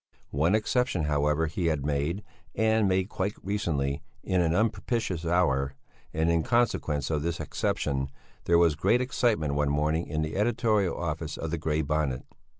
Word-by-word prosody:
One 80 +8 +2
exception, 110 -4 +1
however, 75 +1 +1
he 85 +2 -1
had 75 -4 0
made, 75 +7 -1 0.3
and 110 -1 +3
made 95 0 +1
quite 100 0 -2
recently, 75 -8 -1 0.2
in 95 -2 +1
an 85 0 +2
unpropitious 105 -4 0
hour; 70 -6 +2 0.4
and 80 +1 0
in 85 -1 +3
consequence 80 - +1
of 75 -2 0
this 85 +2 -2
exception 70 -3 -1 0.4
there 85 - +4
was 85 -2 +5
great 85 +11 +2
excitement 115 - +1
one 75 0 +1
morning 75 +3 0
in 80 -1 -1
the 80 +4 -3
editorial 110 -3 +1
office 80 -2 -3
of 80 - -4
the 85 - -2
Grey 80 0 0
Bonnet. 70 -3 -1
80 Hz, 160 wpm, -28 LUFS, 75-100 Hz, 0.4 s, was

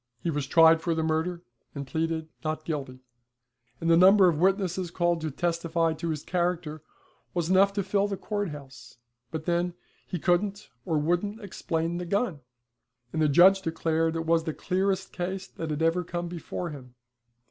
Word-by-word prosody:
He 170 - 0
was 145 -3 -2
tried 165 +1 +6
for 165 -1 0
the 160 - 0
murder, 160 +2 -1 0.3
and 140 0 -4
pleaded 160 +2 -2 0.2
'Not 155 0 -3
guilty'; 135 -5 -4 0.8
and 165 - -3
the 165 - +6
number 190 +2 +7
of 160 -4 +1
witnesses 185 -1 +1
called 175 -1 0
to 160 - -2
testify 165 +1 0
to 165 +1 -4
his 150 -2 -3
character 175 -4 -2 0.5
was 175 0 0
enough 195 +1 +5
to 200 -1 -1
fill 200 +1 +1
the 200 -1 -3
court 205 -2 -3
house, 140 -4 -11 0.3
but 155 +3 -5
then, 175 0 0 0.3
he 180 - -3
couldn't 195 +5 0
or 165 -4 0
wouldn't 175 +8 0
explain 170 -4 -3
the 180 - -4
gun, 200 -4 0 0.7
and 160 - 0
the 155 - +4
judge 190 +6 +6
declared 165 -1 0
it 165 0 -2
was 165 0 +2
the 160 - -3
clearest 190 +1 -1
case 190 +2 -3
that 165 -3 -6
had 155 +1 -1
ever 165 +2 +2
come 175 0 -4
before 170 0 -5
him. 125 -4 -11
170 Hz, 180 wpm, -27 LUFS, 160-180 Hz, 0.8 s, number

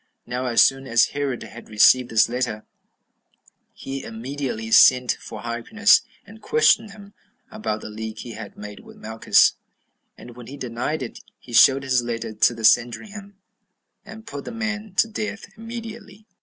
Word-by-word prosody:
Now 125 +1 -4
as 120 - +5
soon 135 0 +1
as 115 -2 +3
Herod 140 -3 -3
had 120 - -12
received 120 +4 +4
this 110 -1 +3
letter, 120 -3 -3 1.1
he 135 0 -7
immediately 115 -1 -5
sent 125 +1 +6
for 110 -2 -9
Hyrcanus, 165 - +3 0.2
and 220 +2 -15
questioned 445 - +3
him 200 0 -14 0.4
about 110 - -4
the - - -8
league 110 0 -7
he 120 - -8
had 110 -2 -10
made 105 0 -9
with - - -16
Malchus; 110 +1 +2 0.6
and 120 -1 -13
when 120 -2 -12
he 140 - -9
denied 130 +4 -4
it, 120 - -8 0.2
he 120 - -14
showed 135 +3 +6
his 130 -2 +1
letter 115 -2 -5
to 115 - +3
the 115 -1 -3
Sanhedrim, 200 - 0 0.7
and 220 +1 -12
put 140 -5 -8
the - - -6
man 215 -3 -5
to 225 - +3
death 215 0 -5
immediately. 225 -2 -9
130 Hz, 160 wpm, -22 LUFS, -, 1.1 s, sent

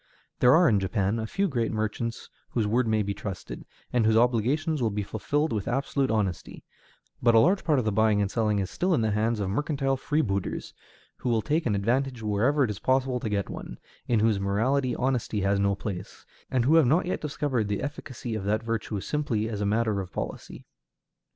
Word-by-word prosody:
There 125 +1 +6
are 175 +1 +5
in 105 -7 +4
Japan 100 +2 0
a 110 - -3
few 195 - 0
great 120 -8 -1
merchants 110 +2 -3 0.2
whose 115 -3 0
word 115 +3 +1
may 110 -1 +2
be 100 0 -2
trusted, 100 -2 -7 0.3
and 120 -2 +3
whose 110 0 +4
obligations 130 +6 +1
will 115 - +2
be 105 0 -2
fulfilled 145 +9 -1
with 105 -3 -2
absolute 135 +2 0
honesty; 100 -5 -2 0.6
but 120 -1 +4
a - - +8
large 185 - +3
part 155 -4 +2
of 125 - 0
the 110 - +1
buying 110 0 +3
and 100 -1 0
selling 110 -3 +1
is 95 -2 -2
still 180 -1 +1
in - - +1
the 110 -1 +1
hands 110 +2 0
of 95 -2 -1
mercantile 135 +2 0
freebooters, 120 -10 -2 0.4
who 125 - -3
will 115 -2 +1
take 155 -1 0
an 105 - +1
advantage 120 +4 0
wherever 115 +8 +2
it 115 - 0
is 100 - -7
possible 130 -1 +1
to 110 - -3
get 100 -1 -1
one, - - -7 0.3
in 115 -3 +2
whose 110 -2 +2
morality 120 +6 +1
honesty 125 -5 -1
has 100 +1 +1
no 100 0 +2
place, 95 -2 -7 0.2
and 125 -2 +1
who 145 - +4
have 155 -6 +5
not 160 +8 +3
yet 180 - -2
discovered 140 -6 -1
the 100 +2 -2
efficacy 130 -4 -5
of 110 -3 -3
that 105 +3 0
virtue 115 -2 -2
simply 120 -3 -1
as 105 -3 -4
a 100 - 0
matter 110 -1 +1
of 90 - -8
policy. - - -6
115 Hz, 210 wpm, -27 LUFS, 105-135 Hz, 0.6 s, a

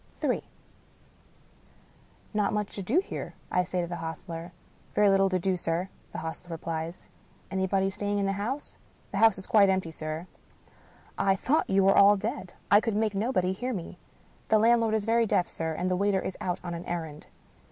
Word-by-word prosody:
Ill - - +1 1.0
" - - -31
Not 210 -1 +1
much 210 -1 -2
to 200 - -4
do 245 - +2
here," - - -6 0.2
I 180 - +3
say 180 0 -2
to 170 - -3
the 175 0 -5
hostler. 165 +1 -6 0.2
" - - -31
Very 205 -1 +5
little 195 0 +4
to 185 - +1
do, 185 +1 0
sir," 175 +2 -2 0.2
the - - -6
hostler 160 +2 -6
replies. 165 +1 -5 0.2
" - - -31
Anybody 190 0 +1
staying 205 +1 -2
in 200 - +1
the 195 - +1
house? 220 +9 -4
" - - -33
" - - -33
The 195 - -2
house 220 -2 +6
is 190 - -5
quite 200 -3 +5
empty, 185 -3 0
sir." 155 +1 -5 0.5
" - - -28 0.3
I 195 -1 +3
thought 270 +10 +1
you 195 0 +4
were 195 +1 +5
all 200 +1 +7
dead, 215 -2 -4 0.2
I 205 +1 +7
could 225 -2 -1
make 215 0 +1
nobody 195 -3 +1
hear 250 +6 -3
me." 175 -1 -7 0.2
" - - -32
The 220 - +5
landlord 225 0 +4
is 215 -2 -1
very 230 0 +3
deaf, 180 -3 +2
sir, 160 -1 -3
and 180 - -1
the 185 - +1
waiter 200 +1 +2
is 185 - -4
out 180 -1 -1
on 175 -1 -4
an 170 +1 -6
errand." 160 -3 -5
195 Hz, 215 wpm, -28 LUFS, 175-210 Hz, 1.0 s, all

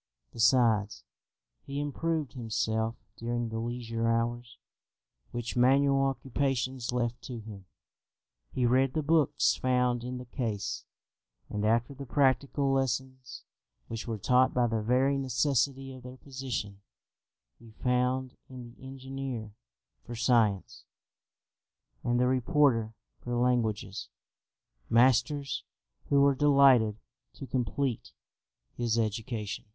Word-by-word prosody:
Besides, 115 -3 +3 0.6
he 140 +1 -5
improved 150 0 -2
himself 110 -2 -1 0.2
during 120 0 -2
the 110 0 -4
leisure 115 -1 -3
hours 120 +1 -1 0.7
which 120 -1 -5
manual 135 +2 +4
occupations 130 -1 -1
left 120 -1 -2
to 125 -3 -7
him; 105 -3 -10 0.9
he 125 - 0
read 130 +2 +3
the 155 - 0
books 155 -1 +3
found 125 -1 +1
in 125 +1 -4
the 125 - -8
case; 115 -5 -3 0.7
and 105 0 -2
after 115 +5 +1
the 140 0 -9
practical 140 +1 +2
lessons 130 -2 -2 0.5
which 115 +1 -5
were 115 -1 -2
taught 125 +5 +3
by 125 -1 +3
the 115 -2 0
very 130 +5 +2
necessity 135 +1 0
of 130 - -11
their 125 +1 -10
position, 130 -8 -5 0.8
he 115 - -15
found 125 +2 -1
in 130 -1 -9
the 120 +2 -14
engineer 130 -4 -6 0.5
for 120 - -7
science, 115 -5 +1 1.2
and 120 0 +1
the 125 - +3
reporter 125 -3 +2 0.2
for 120 0 -4
languages, 115 -5 0 0.8
masters 130 +4 +2 0.5
who 140 -1 +4
were 140 0 +5
delighted 135 -6 +5 0.4
to 135 - -8
complete 125 +1 -2 0.6
his 115 -1 0
education. 110 -1 -3
125 Hz, 115 wpm, -29 LUFS, 115-135 Hz, 1.2 s, were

